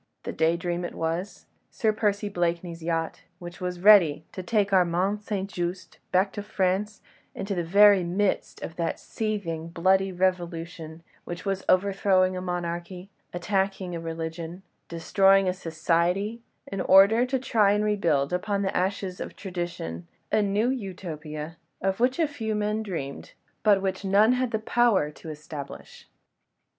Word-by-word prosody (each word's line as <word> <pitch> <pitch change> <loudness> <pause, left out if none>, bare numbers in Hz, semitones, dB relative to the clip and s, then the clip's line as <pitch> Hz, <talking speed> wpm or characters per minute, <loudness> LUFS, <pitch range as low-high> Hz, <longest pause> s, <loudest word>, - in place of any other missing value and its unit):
The - - -5
Day 165 +1 +2
Dream 175 0 -3
it 175 - -5
was, 165 +5 -3 0.2
Sir 220 -1 0
Percy 210 -1 0
Blakeney's 175 -2 -2
yacht, 165 0 -2 0.2
which 175 -1 -10
was 180 -1 -4
ready 175 -7 +6
to 185 - -6
take 205 +2 0
Armand 185 +3 +2
St. 200 -2 -3
Just 175 -1 -5
back 190 +2 +2
to 205 - -4
France 200 +1 -1 0.3
into 200 +1 -3
the 175 -2 -1
very 200 +2 +6
midst 190 +3 -1
of 165 - -7
that 170 -1 -2
seething, 195 -7 -3
bloody 190 +3 +2
Revolution 170 -3 -2 0.2
which 175 +2 -7
was 195 -1 -1
overthrowing 185 -1 +3
a 180 - -4
monarchy, 175 +1 -4 0.2
attacking 190 0 -1
a - - -4
religion, 165 +2 -6 0.3
destroying 195 +3 +3
a 180 - +1
society, 175 +6 0 0.2
in 195 -1 -4
order 200 +6 +6
to 265 +1 0
try 220 -5 +2
and 210 +1 +1
rebuild 170 -9 +1
upon 200 +2 -1
the 190 - -2
ashes 185 0 -1
of - - -6
tradition 175 - -5 0.2
a 215 - +3
new 205 +4 +1
Utopia, 165 - -6 0.2
of 195 +1 -1
which 250 +2 +2
a 325 -2 +2
few 225 -7 -3
men 210 +1 -1
dreamed, 165 -10 -6 0.3
but 200 -3 +4
which 190 0 -2
none 200 +4 +4
had 255 0 0
the 220 - 0
power 220 -8 +2
to 160 - -11
establish. 150 -2 -9
185 Hz, 150 wpm, -26 LUFS, 170-205 Hz, 0.3 s, ready